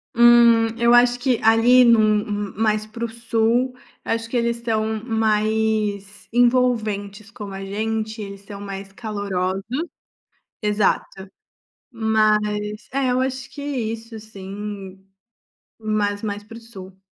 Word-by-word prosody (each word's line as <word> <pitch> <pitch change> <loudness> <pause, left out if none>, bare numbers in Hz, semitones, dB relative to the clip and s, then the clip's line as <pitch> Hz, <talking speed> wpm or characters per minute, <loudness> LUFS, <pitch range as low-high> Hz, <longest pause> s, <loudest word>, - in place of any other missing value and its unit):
Hum, 235 -1 +6
eu 235 0 +4
acho 245 0 +5
que 245 -2 +1
ali 230 +3 +6
num 235 -2 +6 0.5
hum, - - -20
mais 215 0 +1
para 225 +2 -8
o 230 - -2
sul, 230 +2 0 0.3
acho 230 0 -2
que 245 - -1
eles 235 0 -1
tão 220 -1 -1
mais 215 -3 0
envolventes 225 -4 +1
como 210 -4 -8
a 195 0 -6
gente, 220 +2 -3
eles 200 -1 -8
são 200 0 -9
mais 195 -1 -7
calorosos. 195 -3 -3 1.0
Exato. 205 -2 0 0.6
Mas, 215 -2 0
é 265 -1 0
eu 250 +1 +1
acho 265 0 -3
que 285 - -9
isso 230 -5 -4
sim, 195 -2 -8 0.7
mas 215 -1 -1
mais 205 -1 -3
para 215 +2 -12
o - - -12
sul. 190 -5 -12
220 Hz, 130 wpm, -22 LUFS, 205-235 Hz, 1.0 s, Hum